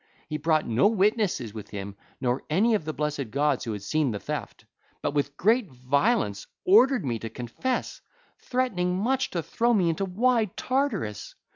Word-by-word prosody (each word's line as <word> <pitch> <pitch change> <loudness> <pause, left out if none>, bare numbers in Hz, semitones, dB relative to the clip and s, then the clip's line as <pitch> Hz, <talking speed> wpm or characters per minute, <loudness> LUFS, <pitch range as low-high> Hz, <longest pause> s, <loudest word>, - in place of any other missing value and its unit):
He 150 - -3
brought 155 0 +1
no 120 - +4
witnesses 205 - +1
with 105 -2 -8
him 100 -1 -6 0.2
nor 125 0 0
any 205 +9 +3
of 205 -8 0
the 155 - -2
blessed 150 -5 -3
gods 140 +1 +1
who 115 - -2
had 105 -1 -6
seen 155 +5 +1
the 105 -3 -3
theft, - - -6 0.4
but - - 0
with 145 -1 -1
great 220 +1 +3
violence 130 - 0 0.2
ordered 235 - +5
me 120 -3 -1
to 115 - -5
confess, 125 - -3 0.4
threatening 185 -9 0
much 260 +7 0
to 170 -2 -3
throw 235 +7 +1
me 180 -5 +3
into 195 +4 -2
wide 220 +2 +1
Tartarus. 255 - -1
160 Hz, 170 wpm, -26 LUFS, -, 0.4 s, ordered